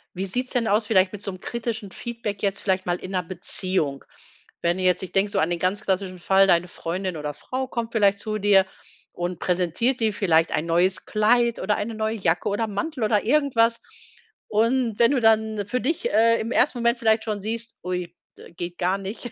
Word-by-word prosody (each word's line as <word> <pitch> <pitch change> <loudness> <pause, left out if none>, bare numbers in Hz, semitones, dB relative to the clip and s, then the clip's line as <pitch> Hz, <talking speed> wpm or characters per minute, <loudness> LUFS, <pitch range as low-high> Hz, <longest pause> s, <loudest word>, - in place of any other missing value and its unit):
Wie 190 - -2
sieht's 250 +7 -3
denn 235 -3 0
aus 210 +1 +2
vielleicht 190 -3 +3
mit 205 - -7
so 200 - -4
'nem 185 - -10
kritischen 225 -2 -4
Feedback 230 -4 -5
jetzt 200 -1 -1
vielleicht 190 -1 0
mal 175 0 0
in 185 - -8
'ner 185 -1 -1
Beziehung? 175 -4 -2 0.6
Wenn 170 +1 +1
du 185 - -2
jetzt 185 0 +2
ich 185 - -6
denke 200 +1 +1
so - - 0
an 160 - +2
den 175 -1 -1
ganz 185 +4 0
klassischen 185 -1 -2
Fall, 195 +2 +4
deine 175 -1 +3
Freundin 180 +1 -4
oder 150 -1 -4
Frau 260 - -4
kommt 235 -3 -4
vielleicht 200 -3 +3
zu 215 0 -3
dir 195 -2 +5 0.5
und 175 0 -4
präsentiert 185 +8 0
dir 220 -2 +1
vielleicht 170 -5 +2
ein 155 - 0
neues 175 +3 +1
Kleid 235 +2 +2
oder 210 +2 0
eine 225 +2 -3
neue 220 0 -1
Jacke 175 -5 0
oder 205 +3 -1
'n 210 - -7
Mantel 255 +5 -3
oder 210 -1 +2
irgendwas. 235 -4 +2 0.7
Und 230 +1 +1
wenn 235 +1 +5
du 275 - +2
dann 220 -2 +2
für 250 +3 -1
dich, 310 +8 -1
äh, 230 +2 +4
im 225 +2 -4
1. 255 -1 +2
Moment 235 +1 +2
vielleicht 220 -1 +3
schon 210 -2 -3
siehst: 230 +2 -4
„Ui, 180 -1 -4 0.2
d - - -14
geht 175 +1 -6
gar 185 +1 +1
nicht,“ 200 +5 -6
205 Hz, 215 wpm, -24 LUFS, 185-230 Hz, 0.7 s, dir